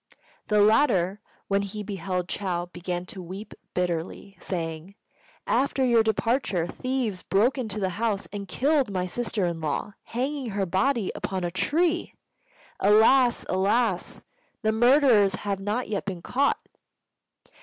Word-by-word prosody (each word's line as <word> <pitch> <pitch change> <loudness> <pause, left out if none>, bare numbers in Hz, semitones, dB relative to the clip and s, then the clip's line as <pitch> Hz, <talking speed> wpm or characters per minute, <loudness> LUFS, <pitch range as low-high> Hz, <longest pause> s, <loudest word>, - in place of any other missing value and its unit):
The 210 -1 +3
latter, 210 -4 +3 0.3
when 200 0 +2
he 200 +1 -5
beheld 185 -3 -3
Chou, 180 -3 -2
began 175 0 -4
to 185 +1 -8
weep 190 +5 -8 0.2
bitterly, 180 +2 -3
saying, 165 +1 -5 0.5
"After 270 0 +1
your 235 -2 +5
departure, 220 -4 0
thieves 245 -2 -2
broke 220 +7 +2
into 215 -4 -3
the 190 -2 0
house 210 +1 -1
and 200 -1 -5
killed 280 +1 +1
my 185 -2 -1
sister 215 0 -1
in 170 -2 -3
law, 160 +6 -2
hanging 265 +1 -3
her 200 -1 -1
body 195 +4 +1
upon 190 -2 -3
a 175 - -1
tree. 335 - 0 0.6
Alas! 230 +5 +5
alas! 195 +1 0 0.4
The 220 - +3
murderers 235 -4 +5
have 200 -1 -3
not 210 +5 -2
yet 205 -2 -3
been 185 -4 -5
caught." 275 +2 +1
205 Hz, 135 wpm, -26 LUFS, 185-240 Hz, 0.6 s, your